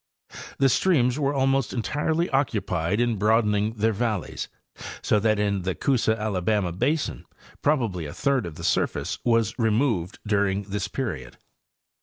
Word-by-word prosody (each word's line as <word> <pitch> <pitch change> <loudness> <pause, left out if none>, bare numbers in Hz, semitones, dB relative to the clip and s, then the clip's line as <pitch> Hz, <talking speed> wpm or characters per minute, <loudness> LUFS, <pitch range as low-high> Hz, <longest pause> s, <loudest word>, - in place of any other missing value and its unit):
The 135 - +4
streams 130 -3 +2
were 140 -1 +1
almost 135 -1 +1
entirely 150 +7 0
occupied 100 - 0
in 120 -2 +1
broad 110 +3 +3
ening 105 +2 0
their 110 +1 +2
valleys, 105 -4 -2 0.6
so 105 - +3
that 110 0 +2
in 100 -2 0
the 95 0 -2
Coosa 115 -5 +1
Alabama 100 -2 0
basin 145 - -1 0.4
probably 115 - 0
a 70 - -8
third 140 -7 +1
of 80 - -8
the - - -9
surface - - 0
was 115 -2 +2
removed 110 -5 +1
during 100 -1 +1
this 100 0 -3
period. 65 - -5
110 Hz, 145 wpm, -25 LUFS, 100-130 Hz, 0.6 s, The